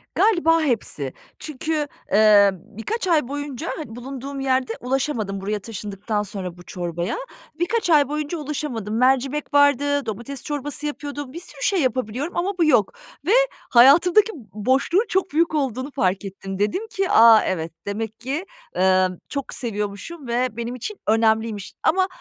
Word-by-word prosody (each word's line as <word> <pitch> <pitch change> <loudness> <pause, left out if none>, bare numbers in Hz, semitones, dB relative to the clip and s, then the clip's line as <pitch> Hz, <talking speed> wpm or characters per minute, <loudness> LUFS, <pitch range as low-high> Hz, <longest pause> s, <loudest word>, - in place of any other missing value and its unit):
Galiba 335 -6 +4
hepsi. 225 - -1 0.3
Çünkü, 305 +1 -2 0.2
eee, 205 -1 +6
birkaç 225 - -5
ay 315 -7 +3
boyunca 290 +2 -5
hani 240 -8 -7
bulunduğum 270 +2 -6
yerde 260 -3 0
ulaşamadım 245 -6 -2
buraya 210 +2 -2
taşındıktan 210 0 -4
sonra 190 -3 -6
bu 175 - -13
çorbaya. 175 0 -4 0.4
Birkaç 385 +3 0
ay 295 -4 +5
boyunca 300 +2 -3
ulaşamadım. 270 -8 -4
Mercimek 270 +4 +1
vardı, 285 -1 +3
domates 235 +5 -5
çorbası 290 0 -4
yapıyordum, 290 -2 -5
bir 340 - -6
sürü 300 -5 -7
şey 385 -4 +2
yapabiliyorum 255 +5 -2
ama 370 +2 -1
bu 340 - +3
yok 245 -10 +3 0.3
ve 370 - +1 0.4
hayatımdaki 340 - +6 0.2
boşluğun 265 - +2
çok 380 0 0
büyük 325 +1 +2
olduğunu 265 -1 -2
fark 195 -7 0
ettim. 195 0 -7
Dedim 360 - 0
ki, 390 -4 -2
“A! 225 -1 +8
Evet, 165 -3 -2 0.2
demek 220 +2 -4
ki, 280 +10 -3 0.3
emm, 185 0 +3
çok 280 -2 -4
seviyormuşum 225 +7 -4
ve 245 +2 +1
benim 235 +1 -4
için 395 - -6
önemliymiş.” 220 -2 +1
Ama 375 +3 +3
260 Hz, 145 wpm, -22 LUFS, 210-300 Hz, 0.4 s, A